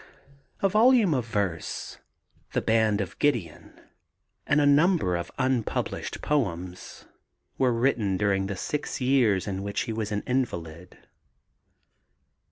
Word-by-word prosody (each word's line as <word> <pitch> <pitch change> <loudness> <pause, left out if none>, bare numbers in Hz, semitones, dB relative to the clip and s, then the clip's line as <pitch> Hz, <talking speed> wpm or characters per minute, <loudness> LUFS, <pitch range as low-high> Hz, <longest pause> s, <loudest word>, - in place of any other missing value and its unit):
A - - +6
volume 215 -2 +4
of 125 -4 -1
verse, 100 -7 -3 0.5
The - - +1
Band 110 -2 +2
of 95 - -6
Gideon, 120 - -2 0.7
and 145 - +3
a 145 - +3
number 145 - +3
of 85 - -4
unpublished 130 -4 -2
poems 90 - -3 0.5
were 130 -2 +3
written 115 -5 +1
during 95 -1 +1
the 100 -1 -4
six 150 +10 -3
years 125 -7 +2
in 95 -1 -3
which 100 0 -2
he 115 - -3
was 110 -1 -3
an 105 0 -2
invalid. 90 -10 -3
110 Hz, 125 wpm, -26 LUFS, 95-135 Hz, 0.7 s, A